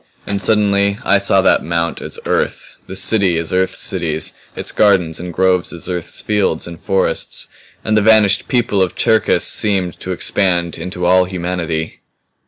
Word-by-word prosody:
And 100 -1 -3
suddenly 100 -2 +2
I 100 - +4
saw 100 -1 +3
that - - +3
mount 85 0 -2
as - - -5
Earth - - -2
the 95 - -8
city 95 -3 +2
as 85 +1 -3
Earth's 95 0 0
cities 80 -4 -2 0.2
its - - -3
gardens 90 -6 +2
and 90 0 -6
groves 90 +1 +1
as 85 -1 -6
Earth's 90 -2 -4
fields 105 -6 0
and 85 -2 -9
forests 95 0 -1 0.4
and 110 - +1
the 110 - +4
vanished 105 -1 +4
people 120 -5 +1
of 95 - 0
Cherkis 110 0 +2
seemed 95 -4 0
to 95 - -6
expand 90 -2 0
into 90 +1 -4
all 90 +1 +4
humanity. 85 -3 -4
95 Hz, 165 wpm, -16 LUFS, 85-100 Hz, 0.4 s, I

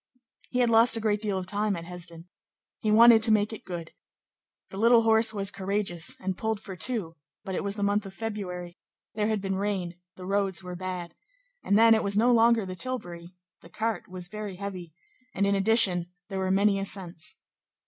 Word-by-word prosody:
He 250 - 0
had 240 - +3
lost 230 +1 +6
a - - -2
great 210 -2 0
deal 205 -3 -1
of 185 - -4
time 205 +1 -1
at 165 -1 -7
Hesdin. 170 -1 -5 0.5
He 215 - -2
wanted 225 +1 +7
to 225 0 +5
make 215 +1 +2
it 220 - -9
good. 170 -3 -7 0.8
The 195 - -8
little 230 +1 +5
horse 220 0 +5
was 200 -2 0
courageous, 190 -4 -2
and 190 0 -3
pulled 220 +1 -2
for 195 -3 -9
two; 180 -3 -1 0.3
but 190 - -5
it - - -2
was 200 0 -2
the 205 - -3
month 205 0 0
of 190 - -10
February, 180 -6 -6 0.3
there 210 -1 -1
had 215 -2 -1
been 195 -1 -2
rain; 190 -4 -3 0.2
the 185 - -10
roads 195 -2 -1
were 180 0 -7
bad. 180 -2 -6 0.5
And 200 - +2
then, 225 0 +6
it 220 - +1
was 200 0 0
no 240 +3 +4
longer 230 -2 +4
the 185 - -6
tilbury. 175 -7 -5 0.3
The 170 - -16
cart 220 +5 -3
was 180 -1 -6
very 210 -1 -7
heavy, 185 -3 -7 0.4
and 200 - +1
in 200 - +2
addition, 195 -4 +4 0.2
there 195 -1 -4
were 190 0 -1
many 195 +1 +2
ascents. 185 -4 -4
200 Hz, 200 wpm, -27 LUFS, 180-220 Hz, 0.8 s, wanted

